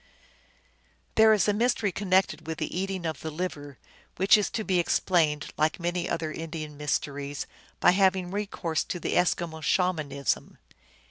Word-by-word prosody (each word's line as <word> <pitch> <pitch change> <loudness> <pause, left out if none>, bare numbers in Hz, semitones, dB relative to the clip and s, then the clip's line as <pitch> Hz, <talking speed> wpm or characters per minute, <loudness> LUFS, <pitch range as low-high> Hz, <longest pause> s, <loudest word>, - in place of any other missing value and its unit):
There 220 0 +6
is 215 -1 +3
a 210 - +3
mystery 225 -2 +1
connected 190 -2 +1
with 160 -1 -3
the 160 -1 -4
eating 190 -1 -2
of 160 -3 -3
the 160 - -5
liver, 150 -4 -5 0.4
which 190 +3 +5
is 210 -2 +1
to 220 - -3
be 185 -3 +1
explained, 165 -4 +1
like 155 +3 +1
many 175 +1 -2
other 160 -2 -2
Indian 155 -2 -6
mysteries, 145 -1 -3 0.3
by - - +6
having 185 -1 +2
recourse 195 -5 -2
to 175 - -4
the - - -2
Eskimo 170 -2 0
Shaman 175 -4 +1
ism. 140 -1 -2
175 Hz, 155 wpm, -27 LUFS, 155-190 Hz, 0.4 s, There